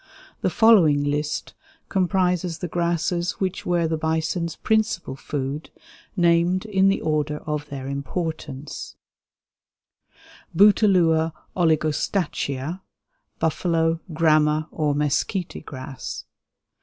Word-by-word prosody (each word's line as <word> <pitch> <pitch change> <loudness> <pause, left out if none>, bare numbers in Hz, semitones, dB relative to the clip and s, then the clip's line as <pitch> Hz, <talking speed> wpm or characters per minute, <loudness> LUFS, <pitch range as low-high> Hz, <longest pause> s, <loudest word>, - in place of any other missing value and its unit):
The - - +2
following 175 -11 +5
list 145 +1 -2 0.3
comprises 180 -2 +1
the 180 - -4
grasses 170 +1 0
which 190 -1 -3
were 175 -2 +2
the 160 -1 -2
bison's 160 +1 -1
principal 220 -9 0
food, 140 +2 -4 0.5
named 175 +2 +3
in 195 -3 +3
the 195 - +2
order 150 -1 0
of 150 -1 -3
their 135 -2 -6
importance: 145 0 -5 1.6
Bouteloua 180 -6 +4 0.2
oligostachya 155 -1 0 0.6
(buffalo, 165 0 +1
grama, 155 -1 +3
or 150 -2 0
mesquite 150 +6 -1
grass). 130 0 -7
160 Hz, 95 wpm, -23 LUFS, 150-180 Hz, 1.6 s, following